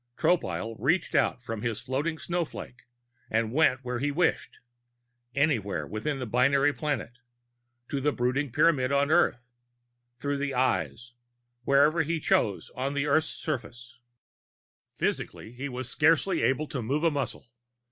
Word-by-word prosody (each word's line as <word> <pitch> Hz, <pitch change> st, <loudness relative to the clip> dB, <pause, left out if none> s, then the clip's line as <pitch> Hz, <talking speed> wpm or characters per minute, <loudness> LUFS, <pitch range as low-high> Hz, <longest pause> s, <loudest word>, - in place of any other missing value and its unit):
Tropile 115 Hz, -10 st, 0 dB
reached 160 Hz, -, +1 dB
out 125 Hz, -, +1 dB
from 115 Hz, -3 st, -5 dB
his 115 Hz, -2 st, -2 dB
floating 140 Hz, +6 st, -2 dB
snowflake 165 Hz, -8 st, -5 dB, 0.4 s
and 115 Hz, 0 st, 0 dB
went 135 Hz, -4 st, +3 dB
where 125 Hz, -1 st, -3 dB
he 145 Hz, +3 st, 0 dB
wished 165 Hz, +4 st, 0 dB, 0.8 s
anywhere 110 Hz, -, +1 dB
within 110 Hz, -, -3 dB
the 130 Hz, -, -4 dB
binary 135 Hz, +5 st, +3 dB
planet; 140 Hz, -5 st, -3 dB, 0.7 s
to 140 Hz, -, -2 dB
the 150 Hz, +2 st, +2 dB
brooding 130 Hz, +2 st, -1 dB
Pyramid 140 Hz, -1 st, +3 dB
on 140 Hz, +1 st, +2 dB
Earth; 125 Hz, -8 st, +2 dB, 0.7 s
through 145 Hz, +2 st, -2 dB
the 140 Hz, -1 st, -2 dB
Eyes, 125 Hz, -1 st, 0 dB, 0.5 s
wherever 145 Hz, +4 st, +4 dB
he 165 Hz, +1 st, -1 dB
chose 105 Hz, -8 st, +1 dB
on 135 Hz, +2 st, -2 dB
Earth's 150 Hz, +2 st, +2 dB
surface. 120 Hz, -4 st, -6 dB, 1.0 s
Physically, 110 Hz, -, -2 dB
he 130 Hz, +4 st, -5 dB
was 130 Hz, -1 st, -5 dB
scarcely 160 Hz, +7 st, +2 dB
able 135 Hz, +3 st, +1 dB
to 130 Hz, -, -3 dB
move 140 Hz, +8 st, -1 dB
a 165 Hz, -, +4 dB
muscle. 140 Hz, -2 st, -3 dB
135 Hz, 135 wpm, -28 LUFS, 120-150 Hz, 1.0 s, wherever